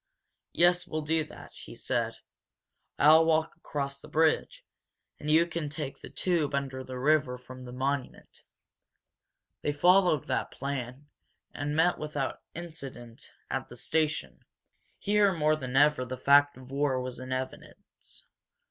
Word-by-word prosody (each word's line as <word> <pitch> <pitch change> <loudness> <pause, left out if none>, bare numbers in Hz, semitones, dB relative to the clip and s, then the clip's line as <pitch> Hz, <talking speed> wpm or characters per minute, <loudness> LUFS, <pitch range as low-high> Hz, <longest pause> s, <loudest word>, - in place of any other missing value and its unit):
"Yes, 175 +1 +4
we'll 155 0 -3
do 160 +1 +1
that," - - -13
he - - -9
said. - - -1 0.8
"I'll 155 +3 +7
walk 160 0 +1
across 140 -4 -4
the - - -12
bridge, 160 - +1 0.5
and 150 - -4
you 160 +2 +5
can 165 -3 -4
take 145 -2 -5
the - - -9
tube 160 -6 0
under 135 -1 -3
the 130 0 -7
river 135 -2 +2
from 130 0 -11
the 125 - -8
Monument." 135 +1 -3 1.2
They 150 - 0
followed 175 0 +4
that - - -1
plan, 135 0 -5 0.5
and 145 +1 -3
met 170 +3 +3
without 150 -3 -3
incident 135 -8 -9 0.2
at 135 0 -3
the 120 - -11
station. 155 +5 -1 0.5
Here 205 -1 +3
more 155 -2 +2
than 130 -4 -5
ever 145 -2 +5
the 130 +1 -5
fact 145 +1 +5
of 130 0 -13
war 140 -2 +1
was 125 -1 -5
in 130 0 -7
evidence. 130 0 -7
145 Hz, 145 wpm, -29 LUFS, 130-160 Hz, 1.2 s, I'll